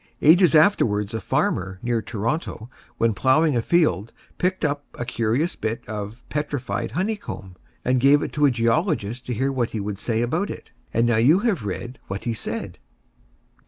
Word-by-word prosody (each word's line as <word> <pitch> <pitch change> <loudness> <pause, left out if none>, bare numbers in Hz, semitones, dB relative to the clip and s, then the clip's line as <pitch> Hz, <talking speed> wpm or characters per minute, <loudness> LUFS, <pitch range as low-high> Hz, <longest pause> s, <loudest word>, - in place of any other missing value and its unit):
Ages 170 +3 +6
afterwards 110 - +3
a 110 - -3
farmer, 95 +1 -1
near 120 -2 0
Toronto, 115 - -3 0.3
when 115 -1 +2
ploughing 140 +7 +3
a 120 - +2
field, 115 - +2 0.3
picked 185 -1 0
up 145 -1 -1
a 120 - -4
curious 120 +7 0
bit 110 +1 -4
of 105 +2 -6
"petrified 140 -6 -3
honey 190 +8 0
comb," 95 - -8 0.3
and 125 +1 +3
gave 140 +3 +5
it - - -5
to 150 -1 +4
a - - +4
geologist 120 - 0
to 125 - -1
hear 135 +5 0
what 125 -4 0
he 110 - -4
would 100 0 -4
say 115 -1 0
about 160 +12 -1
it. - - -8 0.2
And 115 +1 +2
now 120 -1 +2
you 150 - +5
have 205 - 0
read 120 +6 -5
what 95 +1 -5
he 115 - -1
said. 110 - -5
120 Hz, 180 wpm, -23 LUFS, 110-150 Hz, 0.3 s, Ages